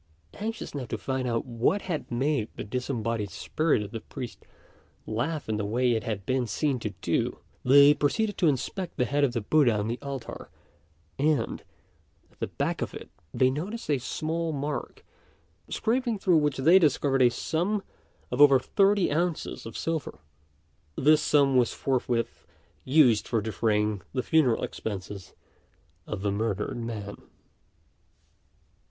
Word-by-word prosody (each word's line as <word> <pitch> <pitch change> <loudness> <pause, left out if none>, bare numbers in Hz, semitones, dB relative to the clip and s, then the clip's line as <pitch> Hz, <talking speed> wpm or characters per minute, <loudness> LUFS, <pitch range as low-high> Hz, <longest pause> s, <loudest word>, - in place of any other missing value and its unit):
Anxious 225 +2 -5
now 140 -3 -4
to - - -4
find 130 -1 -2
out 115 -1 -1
what 125 - 0
had 170 -5 -4
made 130 -1 0
the - - -5
disembodied 115 -2 -2
spirit 105 - 0
of 100 - -8
the 115 - -5
priest 125 +2 -8 0.6
laugh 140 +8 -2
in 110 -1 -1
the 105 - -2
way 120 +4 +1
it 115 -1 0
had 105 -5 -4
been 130 -2 0
seen 135 +4 0
to 110 - -3
do, - - 0 0.3
they 140 +3 +7
proceeded 205 +9 0
to 175 - +4
inspect 165 +6 -2
the 125 - +2
head 145 +4 0
of 130 -4 +2
the 115 - -1
Buddha 120 -1 +3
on 105 +1 -1
the 120 +2 -3
altar; 135 -4 -7 0.7
and, 150 +1 +1 0.7
at - - -29
the - - -2
back - - -2
of - - -3
it, - - -9 0.2
they 130 -1 +3
noticed 185 - -4
a 140 - +2
small 160 +5 -2
mark, 145 0 -4 0.6
scraping 240 0 0
through 180 -3 +3
which 150 -2 +1
they 165 +8 +6
discovered 140 -4 +2
a 125 - +7
sum 175 - -1 0.5
of 125 +3 +1
over 140 -2 +8
thirty 195 +8 +2
ounces 165 -5 -2
of 115 - -7
silver. 165 -2 -3 0.8
This 155 +2 +4
sum 140 -3 +3
was 125 -2 +3
forthwith 125 -3 -1 0.4
used 130 -5 +4
for 115 - +1
defraying 105 -1 0
the 130 - -1
funeral 150 -8 +3
expenses 100 -2 -6 0.7
of 95 - -5
the 100 - +1
murdered 105 0 -2
man. 110 -4 -5
130 Hz, 155 wpm, -27 LUFS, 115-155 Hz, 0.8 s, over